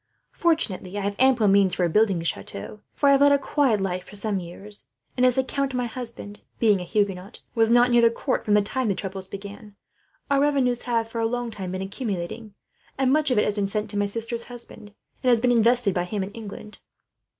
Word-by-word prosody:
Fortunately 205 - -1
I - - -2
have 200 +1 -2
ample 255 -4 +4
means 195 -2 +4
for 180 - 0
rebuilding 195 +3 +3
the 165 - -5
chateau, 100 - -5 0.2
for 285 - +2
I - - +7
have 275 0 +4
led 285 0 +6
a 285 - +5
quiet 275 -5 +1
life 185 -2 -2
for - - -13
some 205 -1 0
years; 195 +4 -9 0.3
and 250 - 0
as 250 -1 +4
the 265 - +2
count 275 0 -2
my 250 -1 0
husband, 230 -3 -8 0.2
being 210 -5 +3
a - - -4
Huguenot, 195 +2 -2
was 225 -1 +3
not 245 +1 +5
near 240 0 +5
the 230 - +6
court 255 +3 -2
from 210 - +2
the 210 - +4
time 255 +4 -2
the 200 - +1
troubles 190 -1 -5
began, 200 +1 -10 0.6
our 280 0 +4
revenues 270 -4 +2
have 230 -2 0
for 230 0 -4
a 225 - +2
long 245 0 -3
time 190 -4 -6
been 185 0 -3
accumulating; 200 0 -5 0.4
and 265 -1 +2
much 305 -1 +2
of 250 - +1
it 210 - +3
has 210 - 0
been 200 -1 -1
sent 210 +1 -3
to 205 - -4
my 205 0 +1
sister's 230 +3 -3
husband, 235 -3 -12 0.3
and 255 - +2
has 240 -2 +5
been 245 +1 +2
invested 235 -2 +3
by 175 -1 -1
him 200 +1 -3
in 190 - -6
England. 215 -1 -10
215 Hz, 230 wpm, -24 LUFS, 200-245 Hz, 0.6 s, I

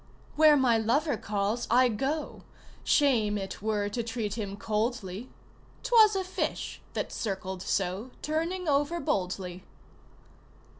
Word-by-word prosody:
"Where 305 -1 +7
my 245 -4 +3
lover 280 +6 +1
calls 210 +1 -2
I 250 +2 +5
go 275 +7 -2 0.4
Shame 230 -8 +3
it 195 -1 -6
were 210 -1 0
to 235 +3 -2
treat 225 -3 -3
him 200 -3 -4
coldly 215 0 -2 0.5
'Twas 435 -4 +6
a 380 - 0
fish 370 - -3
that - - -3
circled 190 -3 -4
so, 195 +4 -1
Turning 330 +4 -2
over 295 +4 +1
boldly." 185 - -2
230 Hz, 120 wpm, -29 LUFS, 205-290 Hz, 0.5 s, Where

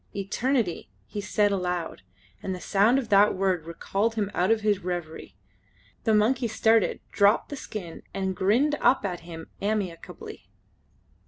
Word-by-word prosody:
"Eternity!" 205 - -1 0.2
he 205 - -5
said 205 0 +1
aloud, 180 - -2 0.4
and 190 - -3
the - - -8
sound 205 +7 +3
of 250 -5 -2
that 205 +1 +5
word 185 -4 0
recalled 200 +6 -1
him 205 -2 -1
out 180 +1 +1
of 225 -1 +3
his 210 -2 +2
reverie. 175 - -5 0.7
The 220 - +4
monkey 240 +4 +2
started, 225 -1 +2
dropped 200 +1 +3
the 285 - -5
skin, 195 -10 -7
and 190 -1 -2
grinned 235 +12 +2
up 245 -3 +3
at 180 -3 -3
him 165 -1 -10
amicably. 200 -5 -4
200 Hz, 150 wpm, -26 LUFS, 180-220 Hz, 0.7 s, that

